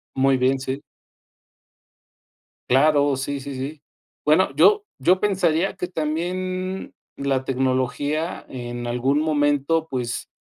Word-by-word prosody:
Muy 135 0 +3
bien, 130 +1 +2
sí. 135 +1 -4 1.9
Claro. 145 +1 +4
Sí, 140 +2 -3
sí, 135 0 -7
sí. 140 +3 -5 0.4
Bueno, - - +4
yo 420 0 +5
yo 185 +1 +4
pensaría 185 -3 +1
que 180 - -3
también 185 +3 -3 0.2
la 135 -1 -1
tecnología, 135 +5 -1
en 120 -1 -6
algún 130 +5 +1
momento, 150 +1 +1
pues, 125 -3 -3
145 Hz, 110 wpm, -23 LUFS, 130-165 Hz, 1.9 s, yo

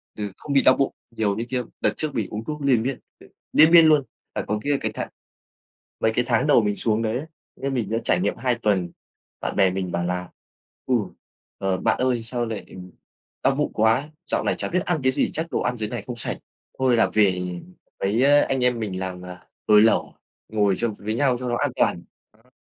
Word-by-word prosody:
ừ, 105 -1 -4
không 145 - -5
bị 135 - +5
đau 130 - +5
bụng 135 - 0 0.2
nhiều 110 -3 0
như 115 +3 -3
kia. 125 -1 -1 0.2
Đợt - - +2
trước 155 -2 -1
mình 110 -4 -1
uống 105 +1 -5
thuốc 150 +4 -5
liền 135 -5 +3
miên, 135 +1 -3 0.2
ừ, - - -16 0.3
liên 155 +2 +7
miên 170 -1 +8
luôn, 155 -2 +5 0.3
phải - - -1
còn 105 0 -1
kia 145 +2 +1
cái - - -2
tháng - - -4 0.9
mấy 110 - +2
cái 125 - +1
tháng 125 +4 +2
đầu 145 - +5
mình 105 -1 0
xuống 110 0 0
đấy 110 +1 -1
ấy, 140 - -5 0.3
như 135 - -3
mình 120 -7 -2
đã 115 - 0
trải - - +2
nghiệm 185 - -1
2 125 -2 0
tuần, 100 -7 0 0.5
bạn - - -3
bè 95 -1 +4
mình 95 -1 -3
bảo 85 0 -1
là 90 0 -3 0.6
"Ừ, 130 - +2 0.6
ờ, 95 -1 -1
bạn 110 +3 +1
ơi 125 -2 +1
sao 120 +1 -1
lại, 110 -2 -5
ừm, 90 0 -11 0.5
đau 135 - +3
bụng 150 +1 -1
quá! 115 +7 +2 0.2
Dạo - - +1
này - - 0
chả - - -1
biết 180 +1 -1
ăn 175 -3 +1
cái 130 - +4
gì - - +1
chắc 160 +1 -1
đồ - - 0
ăn 125 0 -1
dưới 110 -2 -3
này 120 -4 -5
không 125 - -4
sạch, 120 - +1 0.4
thôi 130 -2 +3
là 115 - +3
về 95 -4 +3 0.6
mấy, 105 +6 +1
à, 145 +1 +5
anh 135 -2 0
em 125 -1 +1
mình 100 -4 -4
làm, 90 -1 -5
à, 90 0 -11 0.2
nồi 105 -1 +7
lẩu 115 +1 +3 0.4
ngồi 105 -3 +2
châm 120 -2 -1
với 105 +2 -4
nhau 130 -1 +2
cho 125 -1 -3
nó 120 - 0
an 145 +1 0
toàn." 85 - +1 0.4
Á. 125 - -28
115 Hz, 235 wpm, -23 LUFS, 105-130 Hz, 0.9 s, miên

